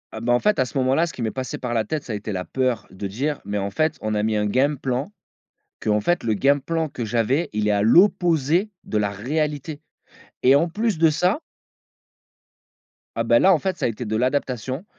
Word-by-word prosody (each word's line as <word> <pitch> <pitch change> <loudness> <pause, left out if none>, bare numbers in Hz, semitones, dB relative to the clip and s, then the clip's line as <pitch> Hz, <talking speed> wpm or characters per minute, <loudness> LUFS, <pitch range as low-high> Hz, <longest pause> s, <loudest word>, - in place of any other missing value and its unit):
Ah 110 - -5
bah, 120 +2 +1
en 120 - +4
fait, 210 +7 +1
à 130 - +3
ce 125 - -6
moment-là, 135 +6 +2
ce 170 - -8
qui - - -7
m'est 110 -1 -1
passé 130 -3 -5
par 125 -2 -4
la 115 -2 0
tête, 155 -2 -3
ça - - -7
a - - -2
été 105 +1 -5
la 90 -1 -3
peur 125 +1 -1
de 95 +1 -5
dire: 135 +9 -2
«Mais 100 +1 -3
en 100 0 -2
fait, 155 +8 0
on 110 0 -2
a 105 0 0
mis 110 0 0
un 105 0 +1
game 135 +7 +1
plan, 135 +8 -3 0.7
qu'en 105 -1 +1
fait, 175 +10 0
le 110 -2 0
game 140 +7 +2
plan, 165 +2 -2
que 125 -4 -5
j'avais, 120 +8 0
il 105 0 -1
est 105 - +3
à 100 0 +2
l'opposé 175 - +3
de 105 - -1
la 105 -1 0
réalité» 145 +7 -3 0.6
et 130 +2 +7
en 165 +5 +2
plus 210 +1 -1
de 165 0 +5
ça 180 - +1 1.8
Ah - - 0
bah, 295 - +5
là 195 - +6
en 165 - +2
fait, 190 0 -2
ça - - -2
a - - +2
été 115 +2 -5
de 110 0 -2
l'adaptation, 130 - -1
130 Hz, 235 wpm, -23 LUFS, 110-160 Hz, 1.8 s, et